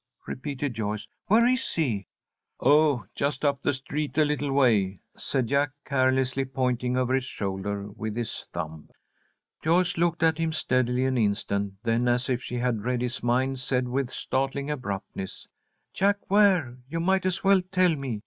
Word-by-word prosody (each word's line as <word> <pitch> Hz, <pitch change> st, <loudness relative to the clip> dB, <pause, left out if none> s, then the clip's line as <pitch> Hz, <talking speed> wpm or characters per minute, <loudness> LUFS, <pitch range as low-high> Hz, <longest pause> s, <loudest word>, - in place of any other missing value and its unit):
repeated 140 Hz, 0 st, -4 dB
Joyce. 105 Hz, -1 st, -3 dB, 0.2 s
"Where 225 Hz, +3 st, +5 dB
is 255 Hz, +1 st, +1 dB
he?" 115 Hz, -, 0 dB, 0.5 s
"Oh, 145 Hz, -6 st, +4 dB
just 140 Hz, 0 st, -1 dB
up 140 Hz, -1 st, +1 dB
the -, -, +2 dB
street 145 Hz, +1 st, -4 dB
a 155 Hz, -, +5 dB
little 145 Hz, -1 st, -1 dB
way," 105 Hz, -9 st, +3 dB, 0.2 s
said 130 Hz, -3 st, -1 dB
Jack, 140 Hz, +3 st, +1 dB
carelessly, 130 Hz, 0 st, +2 dB
pointing 125 Hz, -1 st, -1 dB
over 130 Hz, 0 st, +1 dB
his 130 Hz, -1 st, +2 dB
shoulder 100 Hz, -2 st, -3 dB
with 110 Hz, +1 st, -5 dB
his 120 Hz, -1 st, -4 dB
thumb. 80 Hz, -2 st, -6 dB, 0.7 s
Joyce 175 Hz, +3 st, +2 dB
looked 170 Hz, -1 st, +1 dB
at 160 Hz, -1 st, +3 dB
him 165 Hz, -1 st, 0 dB
steadily 125 Hz, -4 st, +1 dB
an 130 Hz, -1 st, +1 dB
instant, 100 Hz, -2 st, 0 dB
then, 115 Hz, +1 st, +1 dB
as 120 Hz, +2 st, +1 dB
if 125 Hz, -1 st, 0 dB
she 125 Hz, -, -5 dB
had 120 Hz, -3 st, -1 dB
read 125 Hz, 0 st, 0 dB
his 125 Hz, 0 st, -3 dB
mind, 130 Hz, +2 st, +1 dB
said, 125 Hz, -1 st, 0 dB
with 130 Hz, 0 st, -1 dB
startling 135 Hz, +2 st, -2 dB
abruptness: 100 Hz, -7 st, -5 dB, 0.5 s
"Jack 200 Hz, 0 st, 0 dB
Ware, 185 Hz, -12 st, +4 dB
you 165 Hz, -, -2 dB
might 190 Hz, +2 st, +2 dB
as 185 Hz, -, -2 dB
well 195 Hz, -1 st, +5 dB
tell 185 Hz, -2 st, +2 dB
me. 130 Hz, -6 st, -4 dB
130 Hz, 165 wpm, -27 LUFS, 120-150 Hz, 0.7 s, Where